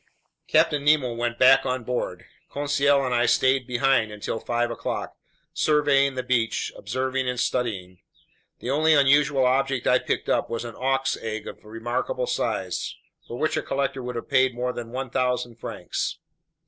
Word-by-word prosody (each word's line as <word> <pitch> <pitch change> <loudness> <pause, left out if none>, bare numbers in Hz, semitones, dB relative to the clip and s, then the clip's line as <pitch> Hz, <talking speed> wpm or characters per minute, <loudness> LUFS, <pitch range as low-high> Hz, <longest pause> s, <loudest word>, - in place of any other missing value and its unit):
Captain 145 -1 +3
Nemo 145 -5 +3
went 120 0 -2
back 135 +1 +6
on 130 -2 -2
board. 125 +1 -3 0.2
Conseil 140 -1 +2
and 125 - -1
I 120 0 +2
stayed 130 0 +2
behind 125 -3 +2
until 105 +2 -4
five 120 +1 -1
o'clock, 120 - -4 0.4
surveying 140 -3 +3
the 130 - -2
beach, 120 -3 0
observing 130 +4 -2
and 125 -1 -3
studying. 95 -9 -2 0.6
The 125 - -3
only 155 +2 +4
unusual 140 -1 +4
object 135 0 +1
I - - +4
picked - - -2
up - - +1
was 115 0 -3
an 115 - -7
auk's 135 +1 0
egg 110 -1 -5
of - - -9
remarkable 120 - -3
size, - - -2 0.3
for - - -6
which - - 0
a - - 0
collector 135 -1 -2
would 125 0 -5
have 115 - -5
paid 130 -1 +3
more 125 +1 -2
than 120 -1 -6
1,000 125 -1 -2
francs. - - -4
130 Hz, 160 wpm, -25 LUFS, 120-135 Hz, 0.6 s, back